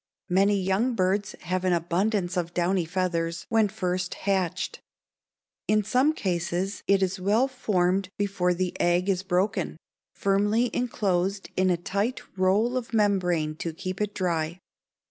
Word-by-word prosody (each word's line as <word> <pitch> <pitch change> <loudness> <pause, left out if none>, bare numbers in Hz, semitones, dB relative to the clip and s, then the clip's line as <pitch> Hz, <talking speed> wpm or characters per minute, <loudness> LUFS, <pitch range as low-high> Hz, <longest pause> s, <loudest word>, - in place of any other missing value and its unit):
Many 195 +2 +3
young 195 +7 +1
birds 195 +1 0
have 180 +1 -2
an 185 -1 +2
abundance 175 +3 0
of 175 -1 -2
downy 180 0 +1
feathers 170 -1 -1
when 225 -2 +4
first 185 -3 -2
hatched. 185 -2 -1 0.9
In 215 0 +3
some 255 +9 +3
cases 180 - -2
it 195 -1 +4
is 190 +1 -1
well 210 +8 +3
formed 195 -7 0
before 195 -3 +1
the 180 0 -2
egg 175 +2 +2
is 185 -2 +1
broken, 190 -1 0 0.4
firmly 205 +4 +2
enclosed 195 -5 -1
in 185 0 +2
a 175 - +2
tight 200 +8 -2
roll 200 +7 +2
of 235 -2 -4
membrane 180 -7 +1
to 165 0 -4
keep 185 +4 -5
it 210 -1 -2
dry. 170 -2 -1
190 Hz, 145 wpm, -26 LUFS, 180-205 Hz, 0.9 s, when